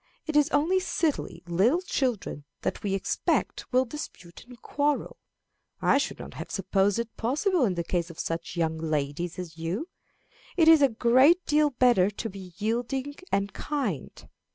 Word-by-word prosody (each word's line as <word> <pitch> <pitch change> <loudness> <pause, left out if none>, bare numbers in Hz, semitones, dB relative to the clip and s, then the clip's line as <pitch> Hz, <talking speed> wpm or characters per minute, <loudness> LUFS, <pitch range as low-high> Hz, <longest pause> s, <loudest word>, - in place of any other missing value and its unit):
It 310 - -4
is 295 +1 +5
only 315 +6 +2
silly 330 -4 -2
little 210 - +2
children 245 - -2 0.2
that - - -2
we 195 -2 -1
expect 195 - -1
will 255 +1 +3
dispute 230 - -9
and 245 -2 -13
quarrel. 290 +4 -1 0.6
I - - +3
should - - -2
not - - -9
have - - -7
supposed 195 +1 +1
it 235 -1 -4
possible 305 - +1
in 190 -5 0
the 170 - -1
case 170 0 -1
of 170 - -11
such 165 0 -4
young 160 -2 0
ladies 155 +1 -2
as 165 -3 -7
you. 185 - -3 0.7
It 325 -3 +5
is 320 -2 +8
a 280 - +6
great 260 +10 +4
deal 300 0 +3
better 245 -7 +4
to 210 +2 -5
be 190 -2 -10
yielding 245 +6 -2 0.2
and 200 +1 0
kind. 260 - -4
230 Hz, 165 wpm, -27 LUFS, 180-290 Hz, 0.7 s, is